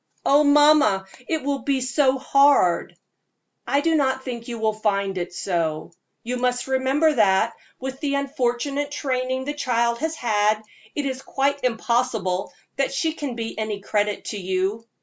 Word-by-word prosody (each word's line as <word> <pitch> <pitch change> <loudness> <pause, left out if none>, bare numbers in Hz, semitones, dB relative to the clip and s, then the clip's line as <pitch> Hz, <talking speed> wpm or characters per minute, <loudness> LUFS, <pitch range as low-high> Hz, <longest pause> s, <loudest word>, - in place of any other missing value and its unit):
"Oh, 285 +2 +5
mamma, 290 -9 +5 0.2
it 320 -3 -1
will 280 0 -1
be 275 -1 0
so 260 +1 +2
hard!" 275 -9 +3 0.7
"I 280 - +2
do 325 +2 +1
not 265 -3 +1
think 235 -3 -6
you 235 -1 -5
will 220 -1 0
find 200 -2 -1
it 175 -1 -3
so. 170 -3 -2 0.3
You 250 +2 -3
must 245 0 0
remember 265 +4 +2
that, 215 -1 +3 0.3
with 265 0 -5
the 285 -2 -1
unfortunate 280 +1 -1
training 260 -2 -2
the 290 - -2
child 235 -4 0
has 320 +1 -2
had, 215 -4 +1 0.3
it 290 - -2
is 265 -1 -3
quite 280 +1 -1
impossible 230 -6 0 0.3
that 275 - +1
she 315 +4 0
can 285 -6 -5
be 225 -1 -5
any 215 -2 -3
credit 205 +1 -1
to 205 - -4
you. 190 +4 -2
255 Hz, 160 wpm, -23 LUFS, 215-280 Hz, 0.7 s, Oh